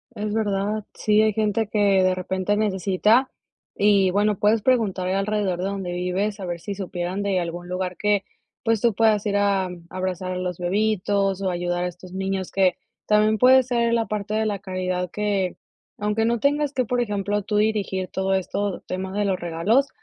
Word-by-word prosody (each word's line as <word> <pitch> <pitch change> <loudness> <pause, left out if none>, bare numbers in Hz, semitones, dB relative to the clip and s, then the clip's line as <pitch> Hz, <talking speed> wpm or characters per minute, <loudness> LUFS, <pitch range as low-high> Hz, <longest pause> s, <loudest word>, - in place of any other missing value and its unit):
Es 210 0 -3
verdad. 210 -1 -1
Sí, 215 0 +2
hay 215 0 +3
gente 215 +1 0
que 200 -2 +3
de 185 0 +3
repente 185 +2 -1
necesita. 210 +4 +2 0.5
Y 200 -2 +4
bueno, 205 +1 +1
puedes 215 +1 +3
preguntar 215 -8 +1
alrededor 195 -1 0
de 180 - -2
donde 195 -2 -3
vives 185 +4 -2
a 190 - -5
ver 175 -1 -4
si 200 +4 -5
supieran 185 -1 -4
de 200 -2 +1
algún 175 0 -5
lugar 180 0 -3
que, 205 -1 +1 0.4
pues, 225 -2 +1
tú 235 -2 +3
puedas 215 -1 +2
ir 205 -1 +1
a 200 -2 +1 0.2
abrazar 185 0 -3
a 180 - -3
los 180 -1 -3
bebitos, 195 +1 0
o 190 - 0
ayudar 175 0 -1
a - - 0
estos 180 +1 -10
niños 190 -1 -3
que, 185 -2 +3 0.3
también 215 +1 +3
puede 260 +3 +6
ser 235 -2 +1
la 230 -1 +2
parte 210 -1 -4
de 220 0 +1
la 205 -2 -1
caridad 185 -1 -3
que, 200 -2 -1 0.4
aunque 210 +2 0
no 235 0 +1
tengas 290 0 +1
que, 255 - +1
por 245 +1 -1
ejemplo, 205 -2 -1
tú 210 +2 -3
dirigir 205 -3 0
todo 190 0 -1
esto, 190 +1 -2
tema 190 +1 -4
de 205 - +2
los 195 -2 0
regalos, 175 +11 +1
200 Hz, 190 wpm, -23 LUFS, 185-215 Hz, 0.5 s, puede